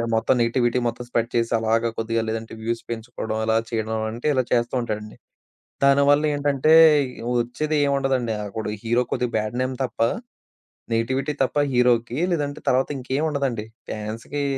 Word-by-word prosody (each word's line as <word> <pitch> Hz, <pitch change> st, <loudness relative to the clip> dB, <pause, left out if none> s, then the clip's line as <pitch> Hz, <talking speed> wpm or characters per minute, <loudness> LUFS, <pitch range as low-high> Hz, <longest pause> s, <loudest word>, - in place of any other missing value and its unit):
మొత్తం 115 Hz, +3 st, +2 dB
నెగటివిటీ 120 Hz, +1 st, +2 dB
మొత్తం 120 Hz, +1 st, -4 dB
స్ప్రెడ్ 115 Hz, -1 st, 0 dB
చేసి, 115 Hz, -1 st, +1 dB
అలాగా 115 Hz, +1 st, +1 dB
కొద్దిగా 115 Hz, 0 st, 0 dB
లేదంటే 110 Hz, 0 st, -4 dB
వ్యూస్ 115 Hz, +1 st, -2 dB
పెంచుకోవడం 115 Hz, -1 st, -4 dB
అలా 110 Hz, 0 st, +2 dB
చేయడం 110 Hz, 0 st, -1 dB
అంటే 120 Hz, +6 st, -4 dB
ఇలా 130 Hz, -2 st, +2 dB
చేస్తూ 120 Hz, +1 st, +1 dB
ఉంటాడండి. 105 Hz, -2 st, -5 dB, 0.7 s
దానివల్లేంటంటే, 145 Hz, +1 st, +3 dB, 0.7 s
వచ్చేదేముండదండి 135 Hz, -2 st, 0 dB
అప్పుడు 110 Hz, +2 st, -5 dB, 0.2 s
హీరో 120 Hz, +2 st, +2 dB
కొద్దిగా 125 Hz, -1 st, -1 dB
బ్యాడ్ 110 Hz, +3 st, -3 dB
నేమ్ 130 Hz, 0 st, -2 dB
తప్ప, 120 Hz, -, -6 dB, 0.9 s
నెగిటివిటీ 130 Hz, +6 st, 0 dB
తప్ప 130 Hz, -, -2 dB, 0.2 s
హీరోకి 120 Hz, 0 st, +2 dB, 0.2 s
లేదంటే 145 Hz, -2 st, -2 dB
తర్వాత 130 Hz, +1 st, +2 dB
ఇంకేముండదండి. 135 Hz, -3 st, -1 dB, 0.2 s
ఫ్యాన్స్‌కి 115 Hz, +7 st, -4 dB
120 Hz, 130 wpm, -23 LUFS, 115-135 Hz, 0.9 s, దానివల్లేంటంటే